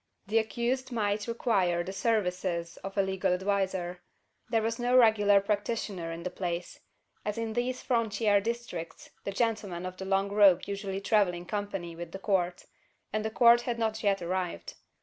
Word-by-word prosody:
The 220 Hz, +3 st, +2 dB
accused 240 Hz, +4 st, -2 dB
might 210 Hz, -2 st, -1 dB
require 195 Hz, -7 st, +1 dB
the 190 Hz, -, -6 dB
services 180 Hz, -5 st, -1 dB
of 195 Hz, +1 st, -8 dB
a 195 Hz, -, +4 dB
legal 190 Hz, -1 st, 0 dB
adviser. 190 Hz, -2 st, -1 dB, 0.5 s
There 225 Hz, -1 st, +2 dB
was 230 Hz, +1 st, -1 dB
no 245 Hz, +1 st, +3 dB
regular 210 Hz, -4 st, +6 dB
practitioner 200 Hz, -4 st, -2 dB
in 165 Hz, +1 st, -6 dB
the 180 Hz, -, -3 dB
place: 175 Hz, -1 st, -4 dB, 0.4 s
as 210 Hz, +1 st, -3 dB
in 225 Hz, -1 st, -2 dB
these 245 Hz, +2 st, -2 dB
frontier 220 Hz, -4 st, +2 dB
districts 225 Hz, -7 st, -5 dB
the 200 Hz, -, -2 dB
gentlemen 200 Hz, -5 st, -1 dB
of 185 Hz, 0 st, -6 dB
the 190 Hz, -, -6 dB
long 195 Hz, +1 st, +1 dB
robe 200 Hz, -3 st, +6 dB
usually 195 Hz, -1 st, -4 dB
travel 200 Hz, -3 st, +3 dB
in 175 Hz, 0 st, -8 dB
company 195 Hz, -4 st, -4 dB
with 170 Hz, 0 st, -8 dB
the -, -, -4 dB
Court; 185 Hz, -3 st, 0 dB, 0.5 s
and 215 Hz, 0 st, 0 dB
the 220 Hz, -, -1 dB
Court 235 Hz, +1 st, +6 dB
had 240 Hz, -1 st, -2 dB
not 220 Hz, -1 st, -1 dB
yet 200 Hz, -3 st, +1 dB
arrived. 175 Hz, -, -3 dB
200 Hz, 170 wpm, -29 LUFS, 180-225 Hz, 0.5 s, regular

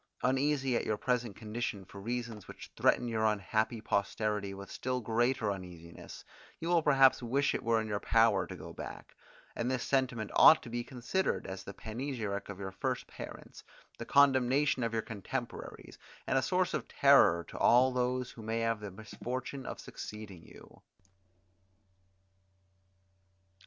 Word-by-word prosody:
Uneasy 135 Hz, 0 st, +1 dB
at -, -, +1 dB
your 110 Hz, -, -1 dB
present 120 Hz, -3 st, -1 dB
condition 110 Hz, -3 st, -4 dB
for 100 Hz, +2 st, -11 dB
reasons 115 Hz, -2 st, -4 dB
which -, -, -11 dB
threaten 120 Hz, -, +2 dB
your 110 Hz, -2 st, -1 dB
unhappy 110 Hz, +2 st, 0 dB
posterity 105 Hz, -1 st, -1 dB
with 100 Hz, 0 st, -9 dB
still 130 Hz, 0 st, -2 dB
greater 120 Hz, -1 st, +1 dB
uneasiness, 90 Hz, -3 st, -9 dB, 0.3 s
you 165 Hz, -, -3 dB
will 175 Hz, -1 st, +4 dB
perhaps 135 Hz, -4 st, +5 dB
wish 140 Hz, +4 st, +1 dB
it -, -, -2 dB
were 115 Hz, 0 st, +2 dB
in 110 Hz, -, -3 dB
your 105 Hz, -1 st, -2 dB
power 115 Hz, -3 st, +3 dB
to -, -, -7 dB
go -, -, -9 dB
back; -, -, -9 dB, 0.4 s
and 120 Hz, -, -1 dB
this 130 Hz, -1 st, -1 dB
sentiment 125 Hz, -6 st, 0 dB
ought 155 Hz, 0 st, +8 dB
to 120 Hz, -, -9 dB
be 120 Hz, 0 st, -2 dB
considered, 130 Hz, +10 st, -2 dB
as 95 Hz, 0 st, -6 dB
the 100 Hz, -, -8 dB
panegyric 110 Hz, -4 st, -4 dB
of 100 Hz, -, -6 dB
your 95 Hz, -1 st, -5 dB
first 95 Hz, -, -2 dB
parents, -, -, -10 dB, 0.4 s
the -, -, -3 dB
condemnation 135 Hz, 0 st, +3 dB
of 115 Hz, -1 st, 0 dB
your 110 Hz, -1 st, -1 dB
contemporaries, 115 Hz, +4 st, -6 dB, 0.3 s
and -, -, 0 dB
a -, -, +4 dB
source -, -, +1 dB
of -, -, -2 dB
terror 85 Hz, 0 st, +5 dB
to -, -, -9 dB
all 125 Hz, +2 st, +5 dB
those 125 Hz, 0 st, -1 dB
who 115 Hz, -, -11 dB
may 110 Hz, +1 st, -2 dB
have 115 Hz, -1 st, 0 dB
the 105 Hz, -1 st, -6 dB
misfortune 125 Hz, +6 st, -6 dB
of -, -, -6 dB
succeeding 105 Hz, -5 st, -9 dB
you. -, -, -16 dB
115 Hz, 160 wpm, -32 LUFS, 105-130 Hz, 0.4 s, ought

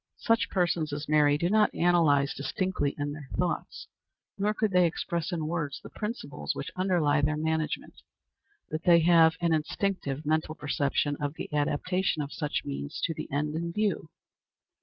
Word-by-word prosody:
Such 230 Hz, 0 st, +1 dB
persons 170 Hz, -4 st, 0 dB
as 145 Hz, +1 st, -4 dB
Mary 150 Hz, -1 st, +4 dB
do 170 Hz, -, 0 dB
not 210 Hz, +2 st, +3 dB
analyze 160 Hz, -5 st, +3 dB
distinctly, 145 Hz, +2 st, -2 dB
in 145 Hz, 0 st, -2 dB
their 145 Hz, -2 st, -9 dB
thoughts, 180 Hz, -1 st, -2 dB, 0.5 s
nor 205 Hz, +1 st, +1 dB
could 215 Hz, -1 st, 0 dB
they 180 Hz, -1 st, +5 dB
express 170 Hz, +1 st, -3 dB
in 165 Hz, -3 st, -2 dB
words, 155 Hz, -3 st, -3 dB
the -, -, -10 dB
principles 210 Hz, -9 st, -4 dB
which -, -, -5 dB
underlie 175 Hz, -6 st, +2 dB
their 150 Hz, +1 st, +1 dB
management; 160 Hz, 0 st, -2 dB, 0.8 s
but 155 Hz, +1 st, -2 dB
they 170 Hz, -1 st, +6 dB
have 165 Hz, -1 st, +6 dB
an 170 Hz, -1 st, +2 dB
instinctive 155 Hz, -2 st, -2 dB
mental 155 Hz, +1 st, 0 dB
perception 145 Hz, -1 st, 0 dB
of 145 Hz, 0 st, -3 dB
the -, -, -7 dB
adaptation 150 Hz, +3 st, 0 dB
of 140 Hz, -, -7 dB
such 150 Hz, -2 st, -2 dB
means 70 Hz, 0 st, -5 dB
to 165 Hz, -, +1 dB
the -, -, -7 dB
end 150 Hz, +2 st, -1 dB
in 170 Hz, +1 st, -3 dB
view. 200 Hz, -4 st, -1 dB
160 Hz, 165 wpm, -28 LUFS, 145-175 Hz, 0.8 s, they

